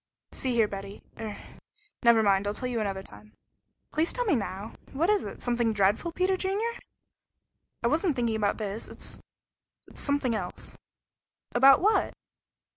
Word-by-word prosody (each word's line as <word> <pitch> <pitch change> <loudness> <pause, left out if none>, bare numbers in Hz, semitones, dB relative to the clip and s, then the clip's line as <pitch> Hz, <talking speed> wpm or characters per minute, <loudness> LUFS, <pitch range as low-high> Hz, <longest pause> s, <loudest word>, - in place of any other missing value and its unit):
See 255 -2 -2
here 225 -2 +4
Betty 200 0 -7 0.2
er 210 -2 -5 0.6
never 235 -2 +6
mind. 200 -1 +3
I'll 205 - -1
tell 250 - -2
you 245 -2 -1
another 195 -3 -2
time." 105 - -15 0.6
"Please 320 +2 +1
tell - - -1
me 390 - +3
now! 200 -1 -4 0.2
What 330 +9 +2
is 420 - +2
it? - - -7
Something 240 -2 +1
dreadful, 205 - +2
Peter 370 +3 +1
Junior?" 415 +6 -1 1.0
"I - - +3
wasn't 315 +3 +2
thinking 235 -3 0
about 205 -2 +1
this; 215 0 -4
it - - -11
it's - - -4 0.7
something 285 -4 +1
else 220 - -5 0.4
" - - -63 0.3
"About 270 +5 +7
what?" 425 +4 +2
235 Hz, 160 wpm, -28 LUFS, 205-315 Hz, 1.0 s, About